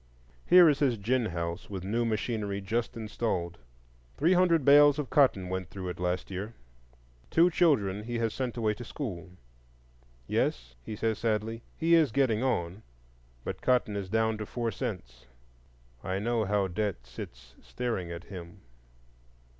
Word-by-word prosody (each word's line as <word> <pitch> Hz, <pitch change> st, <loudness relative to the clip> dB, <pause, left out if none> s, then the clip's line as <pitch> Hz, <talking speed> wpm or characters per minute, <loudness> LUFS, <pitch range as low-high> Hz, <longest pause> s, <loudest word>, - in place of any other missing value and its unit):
Here 180 Hz, -1 st, +8 dB
is 145 Hz, -2 st, +3 dB
his 130 Hz, -5 st, +2 dB
gin 115 Hz, +3 st, 0 dB
house 85 Hz, -1 st, -4 dB
with 95 Hz, -3 st, -5 dB
new 115 Hz, +5 st, 0 dB
machinery 110 Hz, -2 st, -2 dB
just 115 Hz, +4 st, -2 dB
installed. 105 Hz, -6 st, -3 dB, 0.6 s
Three 165 Hz, +5 st, +3 dB
hundred 175 Hz, -5 st, +3 dB
bales 145 Hz, 0 st, +7 dB
of 150 Hz, -4 st, -4 dB
cotton 125 Hz, -10 st, +3 dB
went 95 Hz, -2 st, -4 dB
through 95 Hz, -2 st, -6 dB
it 90 Hz, -, -6 dB
last 90 Hz, +2 st, -2 dB
year. 100 Hz, +5 st, -5 dB, 0.7 s
Two 170 Hz, +2 st, +4 dB
children 105 Hz, -, +2 dB
he 120 Hz, 0 st, -3 dB
has 115 Hz, -2 st, -1 dB
sent 125 Hz, -1 st, -3 dB
away 110 Hz, -2 st, +1 dB
to 120 Hz, -, -8 dB
school. 100 Hz, -, -6 dB, 1.0 s
Yes, -, -, -1 dB
he 105 Hz, -, -6 dB
says 110 Hz, 0 st, -1 dB
sadly, 115 Hz, 0 st, -1 dB, 0.2 s
he 165 Hz, +1 st, +2 dB
is 160 Hz, -4 st, +5 dB
getting 130 Hz, -5 st, +2 dB
on, 95 Hz, -7 st, -1 dB, 0.6 s
but -, -, -5 dB
cotton 125 Hz, -5 st, +2 dB
is 100 Hz, -2 st, -4 dB
down 110 Hz, +1 st, +1 dB
to 105 Hz, -, -5 dB
four 120 Hz, -2 st, -2 dB
cents; 65 Hz, -, -6 dB, 0.8 s
I 95 Hz, +1 st, -2 dB
know 115 Hz, +2 st, 0 dB
how 100 Hz, -1 st, +1 dB
Debt 95 Hz, -, -3 dB
sits -, -, -10 dB
staring 115 Hz, -8 st, -3 dB
at 85 Hz, +1 st, -7 dB
him. 90 Hz, 0 st, -10 dB
110 Hz, 155 wpm, -29 LUFS, 95-125 Hz, 1.0 s, Here